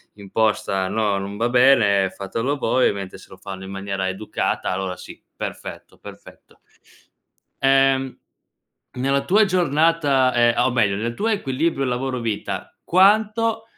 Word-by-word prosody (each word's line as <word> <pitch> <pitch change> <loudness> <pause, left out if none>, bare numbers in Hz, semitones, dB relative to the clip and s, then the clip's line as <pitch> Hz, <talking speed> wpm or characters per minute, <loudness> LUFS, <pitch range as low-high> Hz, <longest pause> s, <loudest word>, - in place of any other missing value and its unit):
imposta 100 -2 -1
"No, 105 -2 0
non 100 +1 -6
va 115 - +1
bene, 115 -6 +4
fatelo 115 +10 -3
voi", 130 -1 +1
ovviamente 100 -2 -6
se - - -16
lo 95 - -13
fanno 95 0 -8
in 95 - -8
maniera 95 -1 -3
educata 95 +3 -3
allora 95 -1 -3
sì; - - -12
perfetto, - - -8
perfetto. - - -15 1.0
Ehm, 135 -1 +2 0.8
nella 135 +2 -1
tua 205 +8 +4
giornata, 155 -7 +2
ehm, 120 -1 +3
o - - +2
meglio, 105 -5 +2
nel 115 +3 -3
tuo 215 - -2
equilibrio 155 - -1
lavoro-vita 120 -7 -3
quanto 215 +4 +3
125 Hz, 130 wpm, -21 LUFS, 100-140 Hz, 1.0 s, bene